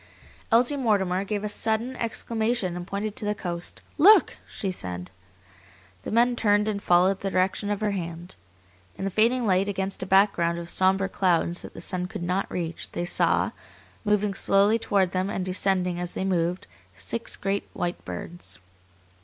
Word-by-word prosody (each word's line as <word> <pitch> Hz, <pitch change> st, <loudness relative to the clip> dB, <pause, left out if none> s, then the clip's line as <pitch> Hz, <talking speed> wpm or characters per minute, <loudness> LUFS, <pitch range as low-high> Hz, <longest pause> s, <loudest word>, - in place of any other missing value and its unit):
Elsie 245 Hz, +5 st, +4 dB
Mortimer 195 Hz, -7 st, +1 dB
gave 205 Hz, 0 st, -3 dB
a -, -, -1 dB
sudden 220 Hz, +4 st, 0 dB
exclamation, 230 Hz, -4 st, -1 dB
and 175 Hz, 0 st, -6 dB
pointed 205 Hz, +2 st, -3 dB
to -, -, -5 dB
the 210 Hz, 0 st, -1 dB, 0.2 s
east. 170 Hz, -, -7 dB, 0.2 s
"Look!" 410 Hz, +8 st, +7 dB
she 195 Hz, -, -3 dB
said. 90 Hz, -, -5 dB, 0.9 s
The -, -, -6 dB
men 240 Hz, +2 st, +3 dB
turned 210 Hz, -2 st, +2 dB
and 205 Hz, -2 st, -2 dB
followed 185 Hz, +2 st, +4 dB
the 195 Hz, -, -2 dB
direction 190 Hz, +2 st, 0 dB
of 205 Hz, 0 st, -2 dB
her 210 Hz, -1 st, +1 dB
hand. 175 Hz, -1 st, -5 dB, 0.6 s
In 195 Hz, -, -3 dB
the 195 Hz, -, -1 dB
fading 235 Hz, +5 st, +2 dB
light, 195 Hz, 0 st, +2 dB
against 195 Hz, 0 st, -2 dB
a 190 Hz, -, -3 dB
background 190 Hz, -3 st, +3 dB
of 170 Hz, 0 st, -5 dB
sombre 190 Hz, +1 st, +2 dB
clouds 175 Hz, -2 st, +1 dB
that -, -, -10 dB
the -, -, -7 dB
sun 180 Hz, -1 st, -2 dB
could 175 Hz, -, -6 dB
not 180 Hz, +3 st, -1 dB
reach, 170 Hz, -2 st, -5 dB
they 175 Hz, -, -2 dB
saw, -, -, +1 dB, 0.5 s
moving 210 Hz, -1 st, +1 dB
slowly 200 Hz, +3 st, +3 dB
toward 195 Hz, -5 st, +1 dB
them 185 Hz, +1 st, -1 dB
and 190 Hz, -2 st, -2 dB
descending 185 Hz, -1 st, 0 dB
as 175 Hz, 0 st, -4 dB
they 190 Hz, -, -2 dB
moved, 180 Hz, -1 st, 0 dB, 0.3 s
six 225 Hz, -, -3 dB
great 195 Hz, +1 st, -2 dB
white 175 Hz, -1 st, -3 dB
birds. 130 Hz, -, -7 dB
195 Hz, 170 wpm, -26 LUFS, 180-210 Hz, 0.9 s, Look